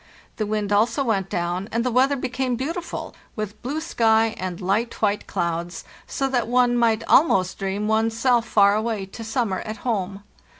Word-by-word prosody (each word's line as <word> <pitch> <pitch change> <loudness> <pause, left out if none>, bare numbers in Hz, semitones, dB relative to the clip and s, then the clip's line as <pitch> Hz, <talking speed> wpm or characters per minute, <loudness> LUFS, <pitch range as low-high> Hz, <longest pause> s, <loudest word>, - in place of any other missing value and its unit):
The 215 - -1
wind 210 -1 -1
also 230 +6 +2
went 195 -6 0
down, 175 +4 -2
and 230 +1 0
the 250 - +1
weather 265 +4 +3
became 255 -1 -2
beautiful, 330 +8 -4 0.2
with 215 -1 -5
blue 285 +5 -3
sky 225 -8 +2
and 180 -2 -4
light 210 +6 -1
white 210 -1 0
clouds, 170 0 -3 0.2
so 270 - -1
that 245 -4 0
one 245 0 +3
might 230 -2 +2
almost 190 - +3
dream 195 +2 -2
one's 225 +1 +1
self 240 -2 +2
far 200 -2 +5
away 215 -2 -1
to 210 +4 -9
summer 225 -4 -1
at 215 +1 -6
home. 200 -4 -2
220 Hz, 175 wpm, -23 LUFS, 200-245 Hz, 0.2 s, far